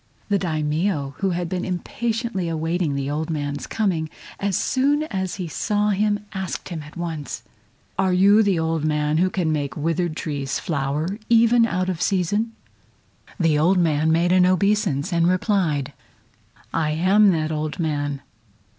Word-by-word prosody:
The 200 -1 +2
Daimio, 155 -2 -1
who 195 - +1
had 175 -1 -2
been 180 +1 -3
impatiently 215 +1 -2
awaiting 165 -1 -1
the 140 0 -2
old 155 +3 -2
man's 145 -2 -3
coming, 180 -8 -1 0.3
as 200 -2 0
soon 285 +3 +1
as 190 - -3
he 185 -3 -4
saw 210 +5 0
him 205 +1 0
asked 190 -2 -4
him 170 -3 -5
at 150 +2 -12
once: 160 -5 -5 0.6
"Are 190 -1 +3
you 200 +4 +5
the 200 -4 +2
old 160 -1 0
man 150 0 +1
who 185 +1 +3
can 180 -4 -1
make 145 -4 -2
withered 165 +1 -1
trees 140 -3 -2
flower 155 +6 -2
even 230 0 +5
out 185 -2 -1
of 180 -3 -2
season?" 205 +5 0 0.9
The 160 -4 +3
old 180 +5 +3
man 160 -2 +2
made 170 +2 +2
an 180 0 +5
obeisance, 185 -4 +1
and 170 0 +3
replied: 175 - +1 0.8
"I 160 -2 +1
am 195 +6 +4
that 155 -1 -1
old 155 0 -3
man!" 145 -4 -2
175 Hz, 155 wpm, -23 LUFS, 155-195 Hz, 0.9 s, you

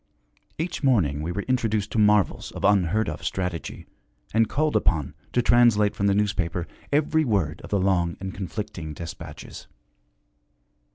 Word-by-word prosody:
Each 170 +3 -3
morning 95 - +2
we 80 +3 -3
were 100 +3 -3
introduced 110 -5 0
to 115 - 0
marvels 105 -2 +3
of - - -7
unheard 100 +1 +3
of - - -5
strategy, 90 -3 -4 0.5
and 110 0 +3
called 155 +1 0
upon 75 -7 +1 0.2
to 125 - +1
translate 115 -4 +4
from 100 - 0
the 100 - +3
newspaper 95 -5 0 0.3
every 155 +2 +2
word 95 - 0
of - - -9
the 100 - +1
long 90 -3 +1
and 95 -1 -5
conflicting 95 -4 -5
dispatches. 80 0 -9
100 Hz, 150 wpm, -25 LUFS, 90-115 Hz, 0.5 s, translate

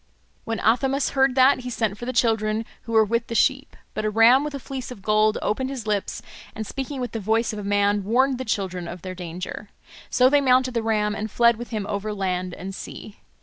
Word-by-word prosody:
When 225 0 -2
Athamas 265 +5 +2
heard 270 -2 +2
that, 265 +1 +5
he 250 0 -6
sent 220 -4 -1
for 240 +3 -8
the - - 0
children, 225 -2 +1 0.2
who 230 - -7
were 220 -1 +5
with 230 +2 -1
the 230 - -5
sheep. 275 +4 +1 0.2
But - - -3
a 215 - +1
ram 230 +5 +5
with 295 -1 -4
a - - -4
fleece 265 -1 -6
of 215 -6 -10
gold 215 +1 +3
opened 260 +5 -1
his 260 -5 -6
lips, 210 -2 -2 0.3
and 220 -1 -4
speaking 270 +4 -5
with 245 -3 -3
the 225 - -4
voice 220 +3 0
of 210 - -5
a - - -6
man 205 0 +1
warned 255 +5 +2
the - - -2
children 185 -4 -2
of 175 0 -8
their 185 -1 -5
danger. 180 +3 -7 0.4
So 250 - +4
they 285 +2 +4
mounted 255 -1 +3
the 230 - 0
ram 210 -2 0
and 215 +1 -4
fled 235 +2 +4
with 240 +2 -8
him 215 -4 -3
over 210 +1 -3
land 185 -2 -2
and 195 +2 -7
sea. 200 +1 -9
225 Hz, 230 wpm, -24 LUFS, 205-255 Hz, 0.4 s, that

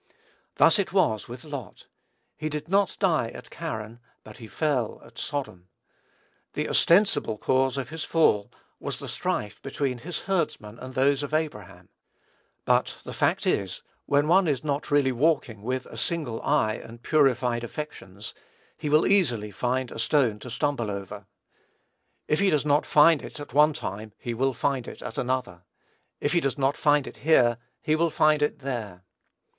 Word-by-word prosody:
Thus - - +5
it 195 - 0
was 110 - +2
with 120 +1 -9
Lot. 140 - -8 0.5
He 155 0 -3
did 150 +1 -5
not 195 +1 +2
die 165 - +2
at - - -11
Charran; 110 +1 -6 0.2
but - - -12
he 115 - -10
fell 135 -4 -1
at - - -12
Sodom. 110 -11 -4 0.9
The - - -2
ostensible 170 - +3
cause 130 +3 +1
of 135 - -3
his 160 0 -5
fall 105 -11 +2 0.3
was - - -4
the - - -7
strife 105 0 -3
between 135 -2 -2
his 165 +6 -5
herdmen 150 - -2
and 130 0 -9
those 135 +1 +3
of 145 +1 -2
Abraham; 150 -12 -4 0.8
but - - +2
the - - -7
fact - - +1
is, 95 -2 -1 0.2
when 145 +1 +3
one 180 +2 +5
is 140 -5 0
not 145 -1 -2
really 145 -2 +3
walking 130 -5 +1
with 125 +3 -2
a - - -11
single 155 -10 -2
eye 140 -7 +2
and 115 +1 -12
purified 125 -5 +2
affections, 110 -7 -7 0.5
he 150 - -2
will 150 +2 +4
easily 120 - +3
find 125 +4 -1
a - - -7
stone 115 -4 +2
to 125 - -9
stumble 130 -3 -1
over. 100 -1 -6 1.0
If 150 - +1
he 200 - +4
does 150 -4 +1
not 145 0 +2
find 150 0 +6
it - - -9
at 145 -4 -9
one 150 +2 +5
time, 110 -7 -6
he 120 - -4
will 130 +2 0
at 125 -4 -2
another. 125 -8 -2 0.6
If 145 - 0
he 175 - +4
does 135 -3 -1
not 135 0 +1
find 145 -2 +3
it - - -9
here, 125 -6 +3 0.2
he 155 - +2
will 165 +1 +2
find 155 -1 +3
it 150 -1 0
there. 110 -9 -5
135 Hz, 170 wpm, -26 LUFS, 115-155 Hz, 1.0 s, find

